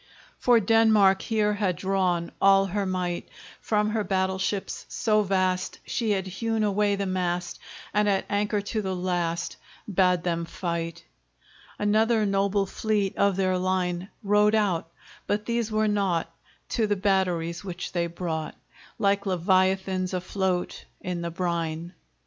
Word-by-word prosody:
For 245 Hz, -2 st, +5 dB
Denmark 215 Hz, -2 st, +4 dB
here 210 Hz, -2 st, +1 dB
had 200 Hz, -3 st, 0 dB
drawn 185 Hz, -3 st, 0 dB
All 195 Hz, 0 st, +6 dB
her 195 Hz, +1 st, -2 dB
might! 180 Hz, -2 st, -2 dB, 0.3 s
From 210 Hz, -1 st, +1 dB
her 215 Hz, -1 st, 0 dB
battle 190 Hz, -1 st, 0 dB
ships 195 Hz, +1 st, -2 dB
so 215 Hz, -1 st, +2 dB
vast 185 Hz, -2 st, 0 dB
She 230 Hz, -3 st, -1 dB
had 195 Hz, -2 st, +1 dB
hewn 220 Hz, +4 st, -1 dB
away 205 Hz, 0 st, +2 dB
the 200 Hz, 0 st, -2 dB
mast, 180 Hz, -2 st, -2 dB, 0.3 s
And 210 Hz, +1 st, +3 dB
at 195 Hz, -1 st, +1 dB
anchor 205 Hz, +1 st, 0 dB
to 215 Hz, +2 st, -3 dB
the 190 Hz, -2 st, -2 dB
last 175 Hz, -2 st, -2 dB, 0.3 s
Bade 180 Hz, -3 st, +2 dB
them 170 Hz, -1 st, -1 dB
fight! 170 Hz, -1 st, -4 dB, 0.7 s
Another 220 Hz, +2 st, +2 dB
noble 200 Hz, 0 st, +1 dB
fleet 205 Hz, 0 st, -1 dB
Of 200 Hz, -1 st, +2 dB
their 185 Hz, -1 st, +1 dB
line 185 Hz, 0 st, -1 dB
Rode 210 Hz, +1 st, +4 dB
out, 190 Hz, -7 st, +1 dB, 0.4 s
but 210 Hz, +1 st, -1 dB
these 235 Hz, -2 st, -1 dB
were 215 Hz, 0 st, +2 dB
naught 190 Hz, -5 st, 0 dB, 0.4 s
To 225 Hz, -3 st, +1 dB
the 205 Hz, -, +1 dB
batteries, 185 Hz, -4 st, 0 dB
which 180 Hz, -2 st, -5 dB
they 170 Hz, -1 st, 0 dB
brought, 165 Hz, -2 st, -4 dB, 0.4 s
Like 200 Hz, 0 st, +1 dB
Leviathans 185 Hz, 0 st, +1 dB
afloat, 185 Hz, 0 st, -2 dB, 0.2 s
In 180 Hz, -1 st, -3 dB
the 170 Hz, -, -3 dB
brine. 170 Hz, -1 st, -3 dB
190 Hz, 145 wpm, -26 LUFS, 180-205 Hz, 0.7 s, All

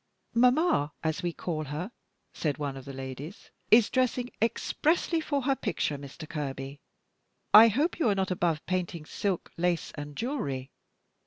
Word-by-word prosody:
"Mamma, 250 Hz, -, +3 dB
as 160 Hz, +1 st, -1 dB
we 175 Hz, -1 st, -1 dB
call 160 Hz, -2 st, -3 dB
her," 155 Hz, -, -4 dB, 0.4 s
said 150 Hz, -3 st, -1 dB
one 145 Hz, -3 st, -3 dB
of 135 Hz, -1 st, -9 dB
the 140 Hz, -, -7 dB
ladies, 135 Hz, +6 st, -8 dB, 0.2 s
"is 225 Hz, -1 st, +6 dB
dressing 255 Hz, -1 st, +1 dB
expressly 320 Hz, +8 st, +1 dB
for 285 Hz, -3 st, -1 dB
her 270 Hz, +1 st, +2 dB
picture, 150 Hz, -, -1 dB
Mr. 140 Hz, +3 st, -9 dB
Kerby. 140 Hz, -2 st, -5 dB, 0.7 s
I 220 Hz, +2 st, +11 dB
hope 285 Hz, -, +1 dB
you 255 Hz, -, +3 dB
are 200 Hz, -, +2 dB
not 190 Hz, -1 st, 0 dB
above 170 Hz, -3 st, 0 dB
painting 175 Hz, -3 st, -2 dB
silk, 190 Hz, +2 st, -2 dB
lace, 175 Hz, 0 st, 0 dB
and 145 Hz, -1 st, -7 dB
jewelry. 140 Hz, -, -3 dB
175 Hz, 155 wpm, -29 LUFS, 145-240 Hz, 0.7 s, I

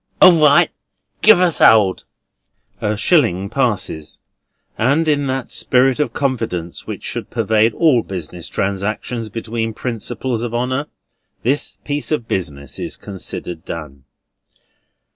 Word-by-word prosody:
"All 175 Hz, -4 st, +7 dB
right. 145 Hz, -1 st, +5 dB, 0.5 s
Give -, -, +7 dB
us 180 Hz, -3 st, +1 dB
'old." 105 Hz, -4 st, +5 dB, 0.8 s
A 105 Hz, 0 st, 0 dB
shilling 100 Hz, -, +2 dB
passes; 80 Hz, -1 st, -2 dB, 0.6 s
and, 140 Hz, +8 st, +2 dB
in 145 Hz, -2 st, +1 dB
that 130 Hz, -1 st, -3 dB
spirit 130 Hz, +1 st, +2 dB
of 150 Hz, -, 0 dB
confidence 115 Hz, -11 st, -3 dB
which -, -, -6 dB
should -, -, -5 dB
pervade 110 Hz, -1 st, +2 dB
all 150 Hz, -8 st, +4 dB
business 90 Hz, -4 st, -7 dB
transactions 105 Hz, +4 st, -2 dB
between 115 Hz, 0 st, -3 dB
principals 120 Hz, 0 st, -3 dB
of 120 Hz, -1 st, -3 dB
honour, 130 Hz, +4 st, -1 dB, 0.6 s
this 135 Hz, +5 st, 0 dB
piece 145 Hz, +1 st, -2 dB
of 135 Hz, -7 st, -1 dB
business 70 Hz, -7 st, -4 dB
is -, -, -4 dB
considered 90 Hz, -4 st, -6 dB
done. 70 Hz, -5 st, -8 dB
115 Hz, 125 wpm, -18 LUFS, 95-135 Hz, 0.8 s, All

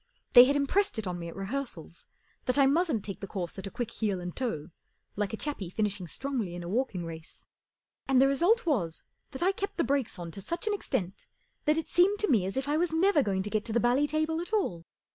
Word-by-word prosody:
They 245 Hz, 0 st, +11 dB
had 280 Hz, +2 st, +2 dB
impressed 285 Hz, -, +1 dB
it 220 Hz, -, -3 dB
on 180 Hz, -1 st, -3 dB
me 170 Hz, -, -5 dB
at 165 Hz, -, -8 dB
rehearsals 195 Hz, -, -5 dB, 0.4 s
that 255 Hz, -, +1 dB
I 275 Hz, -, +6 dB
mustn't 285 Hz, -, +2 dB
take 195 Hz, -, -6 dB
the 195 Hz, -, -6 dB
course 185 Hz, -2 st, -4 dB
at 190 Hz, -, -5 dB
a -, -, -4 dB
quick 235 Hz, +1 st, -4 dB
heel 205 Hz, -4 st, -1 dB
and 175 Hz, 0 st, -6 dB
toe, 180 Hz, -, -3 dB, 0.4 s
like 205 Hz, -1 st, -1 dB
a 220 Hz, -, -4 dB
chappie 250 Hz, -, -3 dB
finishing 205 Hz, -2 st, -2 dB
strongly 235 Hz, -, -3 dB
in 175 Hz, -, -6 dB
a -, -, -6 dB
walking 205 Hz, -4 st, -1 dB
race; 160 Hz, -1 st, -10 dB, 0.6 s
and 265 Hz, -1 st, +4 dB
the 270 Hz, -, +6 dB
result 350 Hz, -, +3 dB
was 190 Hz, -, 0 dB, 0.3 s
that 270 Hz, +3 st, -4 dB
I 375 Hz, -, +4 dB
kept 400 Hz, +1 st, -4 dB
the 335 Hz, -, +2 dB
brakes 270 Hz, -6 st, 0 dB
on 170 Hz, -1 st, -6 dB
to 195 Hz, -, -8 dB
such 340 Hz, -, -2 dB
an 425 Hz, -, +1 dB
extent 190 Hz, -, -3 dB, 0.4 s
that 300 Hz, +1 st, +3 dB
it 320 Hz, -, -2 dB
seemed 380 Hz, +4 st, +4 dB
to 420 Hz, -, +1 dB
me 200 Hz, -7 st, +3 dB
as 195 Hz, -, -4 dB
if 265 Hz, +1 st, -1 dB
I 295 Hz, +1 st, +1 dB
was 345 Hz, 0 st, +1 dB
never 325 Hz, 0 st, +4 dB
going 195 Hz, -5 st, 0 dB
to 210 Hz, -, -5 dB
get 215 Hz, -1 st, 0 dB
to 225 Hz, -, -3 dB
the 235 Hz, -, +3 dB
bally 250 Hz, +5 st, +3 dB
table 310 Hz, +2 st, 0 dB
at 350 Hz, -, -7 dB
all. 180 Hz, -, 0 dB
245 Hz, 245 wpm, -29 LUFS, 190-300 Hz, 0.6 s, They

